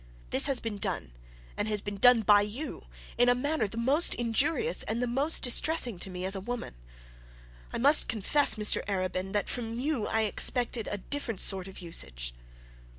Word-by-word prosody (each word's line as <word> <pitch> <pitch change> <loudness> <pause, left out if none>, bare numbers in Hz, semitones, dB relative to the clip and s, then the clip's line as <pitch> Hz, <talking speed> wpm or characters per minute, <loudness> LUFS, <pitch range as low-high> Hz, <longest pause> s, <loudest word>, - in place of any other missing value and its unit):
This - - +6
has 270 -3 +2
been 215 -3 -7
done, - - -4 0.4
and 210 -1 -2
been 205 -1 -7
done 245 +2 +4
by 205 -1 +4
you 225 +9 -7 0.3
in 245 0 +4
a 245 - +3
manner 285 -1 -2
the 225 - -11
most 275 +8 +2
injurious 290 - -1
and 225 +2 -3
the 245 - -1
most 275 +7 0
distressing 245 - +3
to 180 0 -6
a 195 - -3
woman. 240 +5 -7 1.0
I - - -5
must 285 +6 +7
confess, 230 +7 +1
Mr 210 -1 +1
Arabin, 185 -1 -4
that 205 - -1
from 230 -1 -4
you 260 -3 -3
I 220 - -1
expected 230 +2 +1
a 205 - -4
different 230 0 -5
sort 190 -2 +1
of 190 - -12
usage.' - - -1
225 Hz, 170 wpm, -27 LUFS, 200-255 Hz, 1.0 s, must